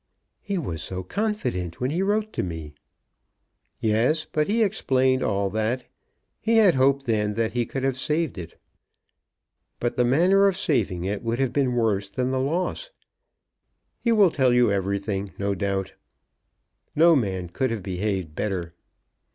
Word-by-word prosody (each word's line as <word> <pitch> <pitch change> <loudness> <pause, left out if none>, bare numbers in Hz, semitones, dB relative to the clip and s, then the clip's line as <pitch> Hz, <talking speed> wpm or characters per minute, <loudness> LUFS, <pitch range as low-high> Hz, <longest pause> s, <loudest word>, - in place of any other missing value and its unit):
"He 200 -2 -3
was 90 - -4
so 95 0 -5
confident 125 - -2
when 125 +2 -1
he 170 +4 0
wrote 210 +2 0
to - - -1
me!" 80 -4 -6 1.1
"Yes; 115 +9 +1
but 150 -1 -1
he 225 +2 +2
explained 130 -10 +1
all 100 -1 0
that. 110 +4 -1 0.6
He 230 +1 +2
had 205 -6 +6
hoped 135 +1 +2
then 105 -3 0
that 115 0 -1
he 120 -1 0
could 135 - -4
have 135 -1 0
saved 155 - -1
it. 85 - -10 1.2
But 120 - -2
the 125 - +4
manner 180 +10 +4
of 190 -2 0
saving 105 - 0
it 100 +1 -2
would 115 0 -2
have 135 -2 0
been 135 -3 +1
worse 105 -4 +1
than 125 +5 -2
the 130 - 0
loss. 175 - -2 1.1
He 235 - +1
will 205 -6 +5
tell 130 -4 +2
you 125 -3 +4
everything, 100 0 -2
no 100 0 -1
doubt. 95 0 -2 1.0
No 165 +2 +6
man 95 - -1
could 130 +9 -1
have 115 -4 -4
behaved 95 -3 -2
better." 90 -3 -3
120 Hz, 160 wpm, -24 LUFS, 100-155 Hz, 1.2 s, had